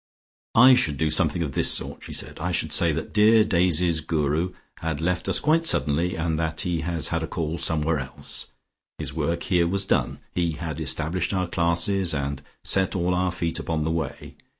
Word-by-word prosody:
"I 125 +3 +8
should 85 - +1
do 75 +1 0
something 80 0 +1
of 75 - -4
this - - +5
sort," - - +1
she - - -10
said. - - -3
"I 85 +3 -2
should 80 - -2
say - - +4
that - - -5
dear 110 +1 +5
Daisy's 85 -4 +1
Guru 80 +3 -1 0.3
had 80 -2 -3
left 90 +2 -1
us - - +4
quite 160 +2 +2
suddenly, 85 - +2
and 80 -1 -2
that 80 -1 -2
he 85 -3 -2
has 85 0 +1
had 80 -1 -1
a 80 - -4
call 80 0 -4
somewhere 80 -1 +1
else. 65 0 -3 0.5
His - - -5
work 85 0 -2
here 85 -2 +1
was 100 +2 0
done; 65 -5 0 0.2
he 85 -2 -1
had 80 0 -6
established 90 +5 -1
our 95 -1 0
classes, 85 +1 +1
and 70 -1 -3 0.2
set 95 -1 +2
all 90 0 0
our 90 0 0
feet 85 -1 -3
upon 80 -2 -2
the 80 - -1
Way. 80 0 -5
85 Hz, 195 wpm, -24 LUFS, 80-90 Hz, 0.5 s, I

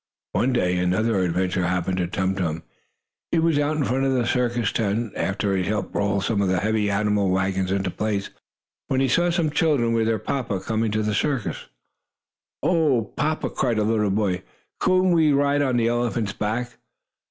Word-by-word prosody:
One 130 - +1
day 90 -7 +1
another 95 +4 +1
adventure 90 0 0
happened 90 +1 -1
to 90 -1 0
Tum 95 +1 -1
Tum. 85 -4 -3 0.7
He - - +2
was 165 -2 +2
out 150 +1 0
in 150 - +1
front 130 +1 0
of 135 - +2
the 125 -2 +1
circus 120 -2 0
tent, 110 +1 -1
after 100 +1 -1
he 95 - +1
had 90 - -3
helped 105 0 -3
roll 100 -1 +1
some 100 +1 0
of 100 - +1
the 95 -1 +1
heavy 110 -1 +1
animal 100 -1 +1
wagons 95 0 0
into 95 -1 -1
place, 105 -1 -2 0.6
when 130 - 0
he 135 - +2
saw 175 +8 +2
some 170 -3 0
children, 145 -7 +2
with 115 -1 +1
their 115 -1 +1
papa, 110 -2 -2
coming 110 +2 -1
to 110 +1 -1
the 105 0 -1
circus. 135 +1 -2 1.0
"Oh, 145 - +1
papa!" 155 +1 -1
cried 115 - 0
a 105 - +2
little 105 -1 +1
boy, 95 -2 0 0.4
"couldn't 185 0 +3
we 160 -3 +4
ride 140 +1 +2
on 130 -3 +1
the 115 -1 +2
elephant's 120 -3 -1
back?" 120 +4 -3
110 Hz, 190 wpm, -23 LUFS, 95-130 Hz, 1.0 s, we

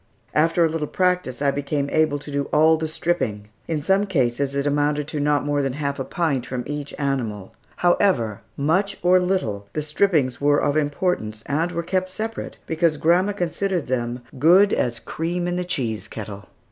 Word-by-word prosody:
After 165 +2 +3
a - - +4
little 155 -1 -2
practice 180 -9 0
I 140 - +3
became 140 0 -2
able 155 -2 +2
to 145 +1 -10
do 140 0 -1
all 160 +1 +4
the 160 0 -2
"stripping." 155 -11 -2 0.2
In 155 -3 -2
some 195 +4 +2
cases 140 -4 0
it 140 0 0
amounted 145 0 +1
to 150 - -3
not 145 0 +1
more 145 0 +1
than 135 -2 -1
half 140 0 -3
a - - -1
pint 145 -5 -1
from 125 -1 -3
each 145 0 -5
animal. 115 -8 -2 0.2
However, 160 - +2 0.2
much 180 +8 +1
or 180 +1 +5
little, 145 - -1
the 155 - -2
strippings 150 -5 +1
were 145 0 +4
of 145 0 +1
importance, 145 - -1
and 160 +5 0
were 170 -1 -2
kept 185 +2 -1
separate, 220 +4 -5
because 160 -1 +1
grandma 180 +6 +3
considered 180 -1 -1
them 120 -1 -2 0.2
"good 185 +7 +6
as 120 -1 0
cream 175 +6 -3
in 175 - -1
the 180 - -1
cheese 115 - -2
kettle." 100 -2 -8
150 Hz, 185 wpm, -23 LUFS, 135-175 Hz, 0.2 s, good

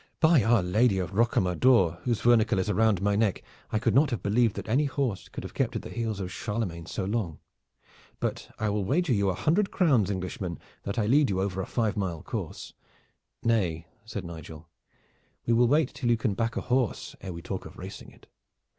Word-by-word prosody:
By 160 -4 +5
our 115 -2 +3
Lady 100 +4 +3
of 90 -1 -2
Rocamadour 95 -3 +3
whose 120 -3 0
vernicle 115 -2 +4
is 95 +3 0
round 105 -1 +2
my 100 0 +2
neck! 105 -2 +1 0.3
I - - +1
could 115 -1 +1
not 145 +5 +5
have 120 -8 -3
believed 110 +1 +2
that - - -6
any 135 +7 +2
horse 135 -7 -2
could - - -7
have - - -8
kept - - -1
at - - -3
the - - -8
heels 110 -3 -3
of 90 -2 -4
Charlemagne 100 -7 -3
so 95 - -3
long. 100 -6 -2 0.8
But - - -3
I 110 - -1
will 105 0 0
wager 145 - +1
you 100 -3 +2
a 90 - 0
hundred 185 - +2
crowns, 135 - +3
Englishman, 90 -2 -3 0.3
that 100 +4 -3
I 110 - +2
lead 140 +5 +4
you 95 -1 0
over 95 -1 -1
a - - -5
five 110 -3 0
mile 90 -6 -3
course." - - -5 0.7
"Nay," 90 -8 +1 0.2
said 110 -4 -6
Nigel, 80 -1 -9 0.8
"we 120 - +2
will 120 +1 +5
wait 145 +1 +2
till 125 -3 -2
you 120 - +4
can 110 -1 0
back 115 +3 -1
a - - 0
horse 125 -3 -1
ere 95 - -6
we 85 -1 -8
talk - - -5
of - - -14
racing - - -9
it. - - -20
105 Hz, 210 wpm, -28 LUFS, 95-120 Hz, 0.8 s, By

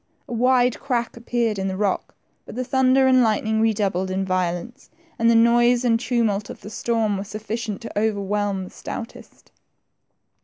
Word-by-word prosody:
A - - -6
wide 250 +1 +2
crack 240 -4 -2
appeared 235 -3 -1
in 190 - -1
the 190 -1 -3
rock, 200 -2 -1 0.3
but - - -9
the 255 - -2
thunder 265 +1 +3
and 260 -1 +5
lightning 220 -1 +1
redoubled 200 -4 0
in 190 +1 -1
violence, 185 +7 -3 0.3
and 230 0 +4
the 235 - +4
noise 240 +2 +4
and 230 -1 +3
tumult 220 -5 0
of - - -9
the 210 - -9
storm 220 -3 0
were - - -3
sufficient 215 +1 -5
to 225 -3 -4
overwhelm 205 -2 -1
tl^e - - -12
stoutest. 230 - -9
225 Hz, 165 wpm, -22 LUFS, 200-240 Hz, 0.3 s, and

